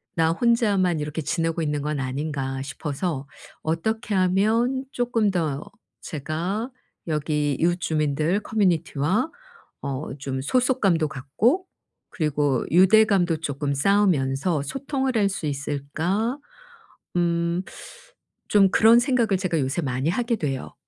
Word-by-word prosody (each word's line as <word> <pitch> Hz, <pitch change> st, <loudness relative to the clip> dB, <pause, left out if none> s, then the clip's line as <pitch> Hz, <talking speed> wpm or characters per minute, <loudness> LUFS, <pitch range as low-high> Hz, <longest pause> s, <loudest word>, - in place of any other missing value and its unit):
'나 165 Hz, -1 st, +3 dB
혼자만 200 Hz, -5 st, +2 dB
이렇게 150 Hz, +2 st, -3 dB
지내고 165 Hz, +2 st, -1 dB
있는 150 Hz, -2 st, -1 dB
건 150 Hz, -1 st, -2 dB
아닌가?' 135 Hz, 0 st, -3 dB
싶어서 145 Hz, +2 st, -4 dB, 0.4 s
'어떻게 210 Hz, +7 st, -1 dB
하면 220 Hz, +8 st, +2 dB
쪼끔 230 Hz, -4 st, +1 dB
더 155 Hz, -6 st, -1 dB, 0.4 s
제가 175 Hz, -, -3 dB, 0.4 s
여기 150 Hz, -1 st, 0 dB
이웃 175 Hz, +2 st, +2 dB
주민들 155 Hz, +5 st, 0 dB
커뮤니티와 185 Hz, -, 0 dB, 0.5 s
어 140 Hz, +1 st, -4 dB
좀 135 Hz, -1 st, -3 dB
소속감도 200 Hz, -, +2 dB
갖고 185 Hz, -, 0 dB, 0.4 s
그리고 145 Hz, -5 st, 0 dB
유대감도 185 Hz, -1 st, +5 dB
쪼끔 145 Hz, -2 st, -2 dB
쌓으면서 160 Hz, -4 st, +2 dB
소통을 270 Hz, -, -2 dB
할 200 Hz, -2 st, +3 dB
수 190 Hz, -4 st, -4 dB
있을까?' 150 Hz, -, -2 dB, 0.8 s
음 170 Hz, 0 st, +1 dB, 0.9 s
좀 195 Hz, -2 st, +5 dB
그런 225 Hz, +4 st, +6 dB
생각을 240 Hz, -6 st, +2 dB
제가 175 Hz, -4 st, 0 dB
요새 135 Hz, +5 st, -1 dB
많이 130 Hz, +1 st, -1 dB
하게 235 Hz, +5 st, 0 dB
돼요. 135 Hz, -7 st, -4 dB
170 Hz, 250 characters per minute, -24 LUFS, 145-210 Hz, 0.9 s, 그런